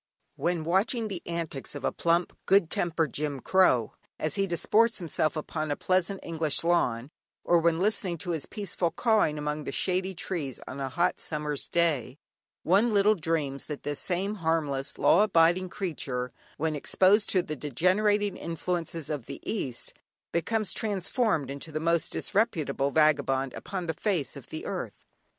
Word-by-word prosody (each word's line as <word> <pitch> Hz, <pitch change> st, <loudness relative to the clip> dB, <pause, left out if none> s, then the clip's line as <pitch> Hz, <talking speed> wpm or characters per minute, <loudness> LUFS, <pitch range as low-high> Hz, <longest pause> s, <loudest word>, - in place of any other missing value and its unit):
When 170 Hz, -2 st, -1 dB
watching 215 Hz, +7 st, +1 dB
the 185 Hz, -4 st, -4 dB
antics 165 Hz, -5 st, -4 dB
of 145 Hz, -, -6 dB
a -, -, +2 dB
plump 170 Hz, +1 st, +1 dB
good 195 Hz, -4 st, +4 dB
tempered 165 Hz, -5 st, 0 dB
Jim 145 Hz, -2 st, -2 dB
Crow, 130 Hz, -, +3 dB, 0.2 s
as 155 Hz, -1 st, -1 dB
he 195 Hz, 0 st, +1 dB
disports 215 Hz, +6 st, +2 dB
himself 165 Hz, -4 st, 0 dB
upon 155 Hz, 0 st, -3 dB
a 145 Hz, -, 0 dB
pleasant 185 Hz, +3 st, 0 dB
English 160 Hz, -3 st, +1 dB
lawn, 140 Hz, -7 st, +1 dB, 0.3 s
or 175 Hz, -, +4 dB
when 165 Hz, 0 st, +2 dB
listening 195 Hz, -3 st, 0 dB
to 175 Hz, -, -4 dB
his 160 Hz, -4 st, -3 dB
peaceful 195 Hz, -4 st, -2 dB
"cawing" 215 Hz, -8 st, +2 dB
among 150 Hz, 0 st, -3 dB
the -, -, -3 dB
shady 185 Hz, +5 st, 0 dB
trees 160 Hz, -7 st, -3 dB
on 135 Hz, -, -6 dB
a 135 Hz, -1 st, -2 dB
hot 175 Hz, +6 st, +1 dB
summer's 150 Hz, -2 st, -3 dB
day, 150 Hz, -7 st, 0 dB, 0.5 s
one 200 Hz, +7 st, +4 dB
little 205 Hz, +1 st, +5 dB
dreams 155 Hz, -6 st, -2 dB
that 150 Hz, -2 st, -6 dB
this 145 Hz, -1 st, -2 dB
same 190 Hz, +3 st, 0 dB
harmless, 150 Hz, -4 st, -1 dB
law 180 Hz, -, +5 dB
abiding 180 Hz, -2 st, +4 dB
creature, 135 Hz, -10 st, -3 dB, 0.2 s
when 155 Hz, 0 st, -1 dB
exposed 195 Hz, +8 st, +3 dB
to 185 Hz, -2 st, +2 dB
the 155 Hz, -, -4 dB
degenerating 190 Hz, -, +1 dB
influences 170 Hz, -1 st, -3 dB
of 145 Hz, -6 st, -4 dB
the -, -, -6 dB
east, 135 Hz, -, -3 dB, 0.4 s
becomes 215 Hz, +5 st, 0 dB
transformed 200 Hz, -, 0 dB
into 140 Hz, +3 st, -6 dB
the 155 Hz, -, -2 dB
most 170 Hz, +1 st, +1 dB
disreputable 155 Hz, -10 st, 0 dB
vagabond 135 Hz, -3 st, +2 dB
upon 185 Hz, -2 st, -5 dB
the 160 Hz, -, -1 dB
face 170 Hz, -, -1 dB
of -, -, -10 dB
the -, -, -6 dB
earth. -, -, -5 dB
165 Hz, 160 wpm, -28 LUFS, 150-190 Hz, 0.5 s, little